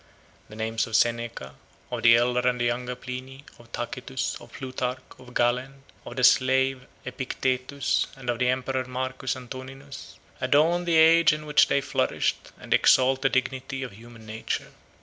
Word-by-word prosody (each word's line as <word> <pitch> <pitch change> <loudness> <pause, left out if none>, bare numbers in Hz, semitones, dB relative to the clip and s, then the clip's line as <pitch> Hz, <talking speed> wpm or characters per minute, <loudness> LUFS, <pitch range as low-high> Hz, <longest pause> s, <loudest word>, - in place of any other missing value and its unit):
The 110 - -11
names 110 +1 -1
of 115 - -3
Seneca, 115 - 0 0.4
of 120 -2 -3
the 115 0 +7
elder 125 +1 +2
and 125 0 -3
the 120 - +1
younger 125 +1 -2
Pliny, 130 +2 -8 0.2
of 120 -1 -18
Tacitus, - - -4
of - - -14
Plutarch, 130 -1 -4 0.2
of 125 -1 -14
Galen, 125 +3 0 0.2
of - - -8
the 130 - -2
slave 130 0 +3 0.2
Epictetus, 130 +1 -1
and 135 -2 -11
of 120 -1 -1
the 125 0 +2
emperor 130 0 -1
Marcus 130 0 -3
Antoninus, 130 +2 -10 0.2
adorn 155 +7 +3
the 170 -1 +1
age 160 0 +6
in 150 0 -5
which 150 0 +4
they 140 - +2
flourished, - - -1
and - - -2
exalt 130 +1 +4
the 135 - +3
dignity 130 +1 -2
of 125 - -6
human 115 +2 -14
nature. 110 +1 -4
130 Hz, 165 wpm, -26 LUFS, 120-135 Hz, 0.4 s, the